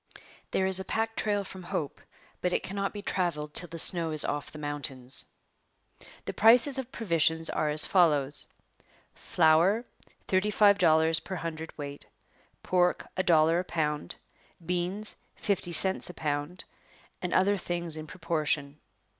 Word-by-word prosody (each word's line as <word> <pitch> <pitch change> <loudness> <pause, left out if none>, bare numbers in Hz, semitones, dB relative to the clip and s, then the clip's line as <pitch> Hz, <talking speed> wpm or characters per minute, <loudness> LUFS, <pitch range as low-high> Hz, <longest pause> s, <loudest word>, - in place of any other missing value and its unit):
There 190 - 0
is 190 0 +4
a - - -4
pack 225 +2 -2
trail 205 -1 -1
from 190 -1 -9
Hope, 160 -4 -5 0.4
but 180 0 -1
it - - 0
cannot 195 +1 -3
be 205 -1 -8
travelled 150 -7 -2
till 175 - -2
the 165 - -8
snow 165 0 +7
is 155 -1 0
off 145 0 -3
the - - -11
mountains. 140 -3 -5 1.0
The - - -5
prices 245 +5 +5
of 260 -1 -7
provisions 165 - +1
are 155 - -1
as 150 0 +6
follows: 150 -6 +1 0.7
flour 175 +8 +2 0.4
thirty 190 +2 +1
five 205 -1 +4
dollars 160 -1 +3
per 190 - -7
hundred 160 -2 -7
weight, 145 -1 -8 0.6
pork 180 -1 0
a - - 0
dollar 165 -1 +3
a - - -2
pound, 150 - -3 0.5
beans 180 +5 -3 0.2
fifty 195 -3 -2
cents 190 +3 0
a 180 - -10
pound, 150 +3 -4 0.6
and 180 - -3
other 200 +2 +2
things 175 -3 -3
in 155 0 -7
proportion. 150 -4 -2
170 Hz, 150 wpm, -28 LUFS, 155-190 Hz, 1.0 s, snow